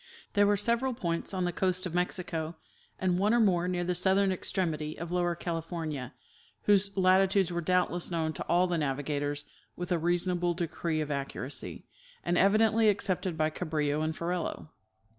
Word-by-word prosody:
Tliere 205 0 +4
were 205 0 +3
several 235 +4 0
points 170 -5 -2
on 185 -2 -1
the 175 - 0
coast 185 +1 0
of 175 - -4
Mexico, 175 -2 -1 0.4
and 180 -1 +1
one 210 +4 +3
or - - +4
more 180 -5 +3
near 180 -1 -1
the 180 +1 0
southern 190 +2 +3
extremity 160 -5 -2
of 170 0 -6
Lower 175 -1 +1
California, 165 -5 -4 0.5
whose 200 -1 +3
latitudes 190 0 +4
were 170 0 -1
doubtless 180 0 +1
known 160 -2 -1
to - - -4
all 175 +1 +4
the 175 -2 0
navigators 145 0 -2 0.3
with 175 +1 -5
a 175 - +2
rea 175 +2 +2
sonable 175 -1 0
decree 165 -1 -2
of 150 -1 -3
accuracy, 140 -1 -5 0.4
and 175 - +1
evidently 215 +3 +4
accepted 190 -4 0
by 155 0 +1
Cabrillo 155 -3 -1
and 155 0 -1
Ferrelo. 170 -2 -3
175 Hz, 170 wpm, -30 LUFS, 160-190 Hz, 0.5 s, Tliere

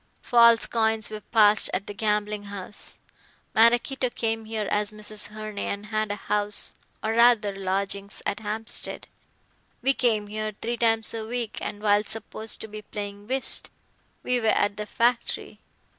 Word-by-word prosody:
False 235 -2 +6
coins 220 -1 0
were 215 0 -6
passed 215 -2 +4
at 195 +2 -2
the 205 - -6
gambling 210 0 -1
house. 200 0 -6 0.5
Maraquito 240 +3 +4
came 225 -2 -2
here 215 -2 -3
as 210 0 +1
Mrs. 215 0 -4
Herne 215 -1 -7
and 200 +1 -3
had 215 0 -1
a - - -1
house 210 0 -2 0.3
or 220 - 0
rather 230 -3 +5
lodgings 195 +1 -3
at 200 - -1
Hampstead. 215 +1 -2 0.8
We 270 +2 +4
came 225 -5 +1
here 215 0 -4
three 235 +1 -2
times 225 -1 +3
a 225 -1 -4
week, 235 0 -3
and 205 0 -5
while 205 0 +4
supposed 220 0 -3
to - - -6
be 215 0 -8
playing 205 -1 -7
whist, 265 +1 +3 0.5
we 250 0 +1
were 225 - 0
at 205 -1 +2
the 210 0 -5
factory. 235 +2 0
215 Hz, 160 wpm, -26 LUFS, 205-225 Hz, 0.8 s, False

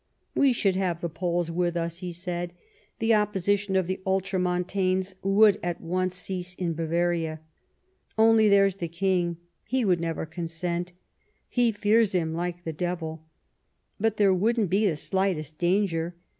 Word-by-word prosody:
"We 275 -2 +4
should 200 -5 +1
have 180 -3 -1
the 170 - -3
Poles 170 +1 -1
with 175 0 0
us," 170 0 -3
he 180 -1 -5
said; 175 0 -5 0.4
"the 225 0 +2
opposition 205 -1 +1
of 190 -1 +3
the 185 +2 -3
Ultramontanes 185 0 0
would 200 +1 +5
at 175 -1 -3
once 185 +2 -1
cease 180 -1 -4
in 175 -3 -2
Bavaria. 165 0 -1 0.8
Only 220 -1 +5
there's 195 -1 +4
the 170 - -3
King; 175 0 0 0.3
he 255 -2 0
would 180 -3 +3
never 165 -1 -2
consent; 170 +2 -4 0.5
he 245 -2 +2
fears 215 0 +2
him 165 -3 0
like 175 +1 -3
the 160 - -4
devil. 165 -1 -3 0.8
But 220 +1 +1
there 200 -2 +4
wouldn't 215 +1 +1
be 205 +3 +3
the 165 - +1
slightest 160 -3 -1
danger. 175 -2 +1
180 Hz, 150 wpm, -26 LUFS, 170-195 Hz, 0.8 s, would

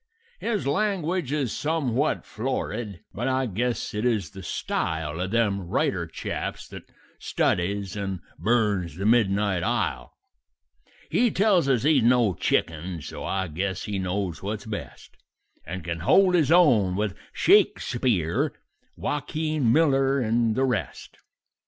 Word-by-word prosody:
"His 215 -8 -1
language 175 -2 0
is 140 -7 -1
some 150 -3 -1 0.3
florid, 110 -4 -4
but 120 +5 -3
I 130 0 +1
guess 120 +3 -2
it 105 +1 -2
is 115 -5 0
the 95 - -9
style 80 -2 -3
Of 95 - -2
them 100 -5 0
writer - - 0
chaps - - -5
that - - -11 0.3
studies 100 +2 -1
and 95 -2 -3 0.2
burns 105 -8 +1
the 95 +3 -4
midnight 100 -4 +2
ile; - - -2 0.9
He 245 0 +3
tells 190 -8 +3
us 125 -4 +2
he's 150 -2 +4
no 120 -3 +4
chicken; 85 0 -1
so - - -7
I 95 -1 -1
guess 95 +3 -3
he 100 -2 -3
knows 90 -2 -2
what's 105 +1 -4
best, 110 -2 -8 0.5
And 90 +2 -5
can 85 0 -4
hold 185 - +4
his 160 -4 +3
own 120 - +5
with 105 0 -1 0.2
Shakespeare, 105 - +2 0.4
Waukeen 155 -3 -1
Miller, 135 -2 +3
and 115 -1 +1
the 135 - +2
rest. 125 -6 -3
110 Hz, 135 wpm, -25 LUFS, 95-135 Hz, 0.9 s, own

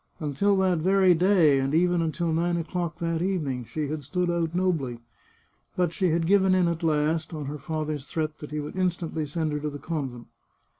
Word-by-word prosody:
Until 165 +7 +1
that 185 -3 +2
very 190 +2 +4
day, 170 -5 +4
and 135 +3 0
even 175 +1 +3
until 165 0 -1
nine 170 +1 +1
o'clock 170 -1 -3
that 165 -1 -1
evening, 150 -10 -1
she 150 +5 -3
had 150 -1 -4
stood 180 +5 -1
out 170 -1 -1
nobly. 165 -10 0 0.8
But 175 -2 +1
she 185 0 +1
had 165 +1 +1
given 190 +1 +4
in 180 -2 +3
at 170 -1 -2
last, 160 +1 0
on 150 -2 -5
her 145 +2 -5
father's 155 -2 -4
threat 155 -1 -3
that 150 - -8
he 150 - -3
would 150 +3 -6
instantly 175 -4 -1
send 155 +1 -2
her 150 - -2
to 150 +1 -3
the 145 - -7
convent. 135 -6 -4
165 Hz, 200 wpm, -26 LUFS, 150-180 Hz, 0.8 s, very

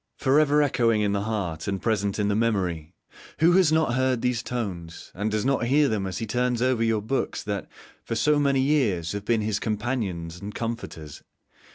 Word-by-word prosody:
For 135 +1 +3
ever 150 0 +4
echoing 115 -5 +2
in 105 -1 +1
the 100 0 0
heart 95 -8 -3
and 100 -1 -1
present 100 -3 0
in 105 -1 0
the 100 - +1
memory: 90 -8 -1 0.4
who 165 +2 +5
has 180 -3 +4
not 160 -6 +2
heard 130 -1 +1
these 125 -2 +1
tones, 95 -10 -5
who 105 +4 -1
does 110 +1 -1
not 135 -3 +1
hear 145 +3 +4
them 100 -3 -1
as 95 - -4
he 115 - -3
turns 125 +2 0
over 125 -2 +1
your 110 -2 +1
books 135 +5 -2
that, 100 -1 -4 0.4
for 115 - -3
so 150 +5 +3
many 140 -2 +2
years, 115 - +1
have 100 0 -5
been 115 -1 +2
his 105 -1 -1
companions 105 -7 -3
and 105 +1 -7
comforters? 115 -10 -6
110 Hz, 200 wpm, -25 LUFS, 100-130 Hz, 0.4 s, who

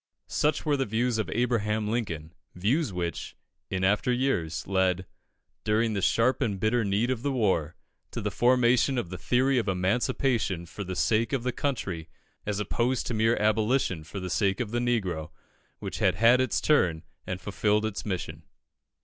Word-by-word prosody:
Such 150 +2 0
were 145 -2 +2
the 135 - -1
views 115 +2 0
of 110 - -2
Abraham 110 -3 0
Lincoln 85 -9 -3 0.2
views 115 - +1
which, 85 -2 -4 0.3
in 95 0 -2
after 105 +6 +2
years, 120 - -1
led, 95 -1 +1 0.6
during 110 +1 +1
the 100 - -1
sharp 120 +8 +2
and 105 -7 0
bitter 110 +3 +2
need 105 +5 +1
of 125 -3 -2
the 140 +2 -1
war, 95 - 0 0.3
to - - -5
the - - -2
formation 125 +1 +3
of 110 -8 -3
the 95 - -5
theory 130 +4 +2
of 115 - -3
Emancipation 100 0 0
for 100 +4 -7
the 95 -1 -5
sake 110 +6 +1
of 130 -4 0
the 125 - 0
Country, 105 - -3 0.4
as 105 -1 -1
opposed 120 +5 0
to - - -3
mere 110 +1 +2
Abolition 110 -4 +1
for 90 +6 -7
the 90 -1 -5
sake 95 +3 +1
of 115 -4 -3
the 120 - 0
Negro, 95 -11 -1 0.5
which - - -6
had - - +3
had 120 +3 +5
its 105 -9 +1
turn 85 - +2 0.2
and 90 0 -3
fulfilled 105 +2 0
its 110 -2 -3
mission. 85 -6 -4
110 Hz, 175 wpm, -27 LUFS, 95-125 Hz, 0.6 s, had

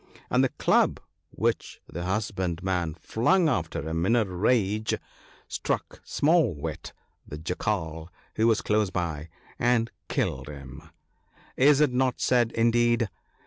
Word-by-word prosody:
And - - +4
the - - +3
club - - +2 0.3
which - - -2
the 85 - -7
hus 105 +4 -1
bandman 90 -3 -2
flung 160 - +2
after 85 - -1
him 80 +1 -1
in 115 - +4
a 115 -3 +3
rage, 105 +3 +1 0.5
struck - - -3
Small 155 - +2
wit, 70 - -6 0.4
the 75 - -7
Jackal 80 -1 -3 0.3
(who 110 +1 +3
was 115 -2 +3
close 105 -2 +2
by), 85 -4 -3 0.3
and 120 -1 +2 0.2
killed 65 +2 -1
him. 70 +2 -10 0.7
Is 145 +2 +5
it 145 -4 +3
not 130 0 +1
said, 120 -2 +2
indeed 120 -1 +2
105 Hz, 135 wpm, -27 LUFS, 80-120 Hz, 0.7 s, Is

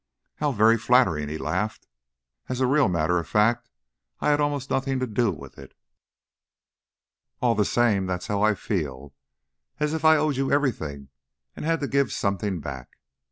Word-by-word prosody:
"How 150 -1 0
very 115 -1 +4
flattering!" 110 - +2
he 80 - -4
laughed. - - -3 0.6
"As 130 -1 -3
a 130 - +3
real 135 -2 +3
matter 85 0 +1
of 85 - -6
fact, 110 +3 +1 0.5
I - - +2
had 145 0 +2
almost 145 -2 -2
nothing 135 0 0
to 130 - 0
do 120 0 0
with 80 - -11
it." - - -13 1.6
"All 120 -2 +2
the 105 -2 +1
same 105 -6 +2
that's 90 -1 -3
how 100 -1 -1
I 105 0 +3
feel 70 -8 -4 0.7
as 150 +1 0
if 160 0 -3
I 160 0 +6
owed 150 -2 0
you 135 0 0
everything 80 - -1 0.5
and - - -6
had 165 0 0
to 140 - -1
give 140 -5 +1
something 100 -3 -2
back. 65 -3 -8
115 Hz, 170 wpm, -25 LUFS, 90-135 Hz, 1.6 s, I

